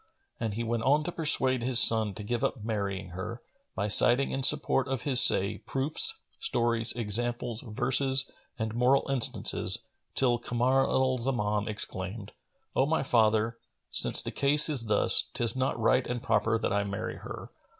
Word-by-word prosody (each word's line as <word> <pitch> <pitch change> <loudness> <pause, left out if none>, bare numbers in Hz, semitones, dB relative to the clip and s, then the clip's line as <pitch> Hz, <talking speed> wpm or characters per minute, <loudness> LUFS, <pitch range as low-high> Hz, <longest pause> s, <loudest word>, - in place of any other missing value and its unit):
And 110 -3 -4
he 115 - -4
went 115 0 -3
on 145 +5 +1
to 175 - -5
persuade 130 -6 0
his 125 0 +2
son 110 -4 +4
to 105 - -8
give 120 +3 -4
up 115 - -3
marrying 100 -4 -5
her, 95 +7 -8 0.4
by 100 - -3
citing 120 +5 +2
in 135 - -4
support 140 -1 +3
of 130 -3 -4
his 130 -4 +7
say, 100 -5 +9
proofs, 155 - -3 0.2
stories, 115 -1 -1
examples, 120 +1 -4
verses 130 +3 0 0.3
and 110 -1 -5
moral 125 +3 +1
instances, 130 -4 0 0.4
till 120 -2 0
Kamar 125 +3 -1
al 130 -1 0
Zaman 105 -5 -2
exclaimed, 100 0 -4 0.4
"O 135 - +1
my 160 -2 -1
father, 110 -2 0 0.3
since - - +1
the - - -6
case 145 +3 +1
is 135 -6 -2
thus, 105 -1 +3
'tis 120 0 -2
not 130 -2 -3
right 115 +3 +1
and 120 -1 -5
proper 115 0 0
that 110 - -3
I 100 0 0
marry 100 0 -6
her." - - -10
120 Hz, 165 wpm, -27 LUFS, 110-130 Hz, 0.4 s, say